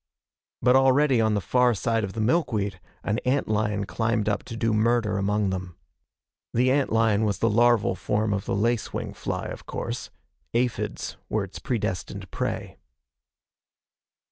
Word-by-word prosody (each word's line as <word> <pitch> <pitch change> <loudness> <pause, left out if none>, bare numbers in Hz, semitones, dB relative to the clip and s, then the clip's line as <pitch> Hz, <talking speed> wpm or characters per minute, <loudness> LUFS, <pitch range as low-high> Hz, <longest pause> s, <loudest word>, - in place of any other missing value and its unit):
But 125 +2 +5
already 135 -1 +4
on 110 -1 +2
the - - +2
far 125 +5 +3
side 115 +4 0
of 95 -2 -4
the 110 - -3
milkweed, 110 - 0 0.2
an 110 +2 0
ant 130 +2 0
lion 105 -1 0
climbed 115 0 0
up 105 -1 +1
to 115 - -7
do 115 -1 +1
murder 110 -2 +2
among 100 0 +1
them. 90 -2 -5 0.8
The 125 +2 +4
ant 140 0 +1
lion 110 -1 +3
was 105 -2 0
the 115 - +2
larval 120 -2 +4
form 105 +3 -1
the 100 -1 -1
lace 115 +1 0
wing - - -4
fly, - - -4
of - - -7
course. - - -4 0.5
Aphids 120 0 -1
were 110 - 0
its 95 - -8
predestined 100 -7 -3
prey. - - -3
110 Hz, 155 wpm, -26 LUFS, 100-120 Hz, 0.8 s, But